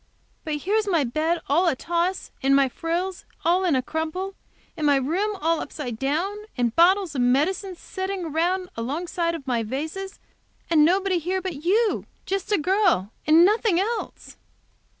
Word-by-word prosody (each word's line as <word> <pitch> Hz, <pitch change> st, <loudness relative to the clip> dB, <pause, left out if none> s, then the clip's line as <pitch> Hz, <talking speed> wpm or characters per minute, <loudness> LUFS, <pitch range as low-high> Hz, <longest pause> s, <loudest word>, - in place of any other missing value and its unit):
But 310 Hz, -1 st, -2 dB
here's 410 Hz, +8 st, 0 dB
my 335 Hz, -6 st, +2 dB
bed 315 Hz, +7 st, 0 dB
all 335 Hz, +6 st, +3 dB
in 330 Hz, -, +3 dB
a -, -, -6 dB
toss, 345 Hz, +6 st, -2 dB
and 275 Hz, 0 st, +4 dB
my 275 Hz, -1 st, +4 dB
frills 345 Hz, +7 st, -3 dB, 0.2 s
all 355 Hz, +3 st, +3 dB
in 345 Hz, -6 st, +2 dB
a 255 Hz, -, +1 dB
crumple 320 Hz, +7 st, -3 dB, 0.4 s
and 305 Hz, -2 st, 0 dB
my 285 Hz, -, +5 dB
room 365 Hz, +10 st, 0 dB
all 325 Hz, +1 st, +1 dB
upside 245 Hz, -6 st, -6 dB
down, 325 Hz, +10 st, -1 dB, 0.2 s
and 240 Hz, -2 st, 0 dB
bottles 365 Hz, 0 st, +4 dB
of 265 Hz, -, -1 dB
medicine 345 Hz, +10 st, +1 dB
setting 380 Hz, +1 st, -4 dB
around 350 Hz, +4 st, 0 dB
alongside 335 Hz, +7 st, -2 dB
of 295 Hz, -5 st, -8 dB
my 245 Hz, -3 st, 0 dB
vases, 315 Hz, -, -5 dB, 0.5 s
and 310 Hz, -2 st, +6 dB
nobody 370 Hz, +2 st, +2 dB
here 365 Hz, +4 st, -1 dB
but 350 Hz, -6 st, -6 dB
you, 425 Hz, +5 st, +2 dB, 0.2 s
just 390 Hz, +1 st, -3 dB
a 410 Hz, -, +4 dB
girl, 350 Hz, -, +2 dB
and 320 Hz, +3 st, +7 dB
nothing 420 Hz, -3 st, +2 dB
else!" 450 Hz, +4 st, -4 dB
335 Hz, 170 wpm, -24 LUFS, 295-380 Hz, 0.5 s, and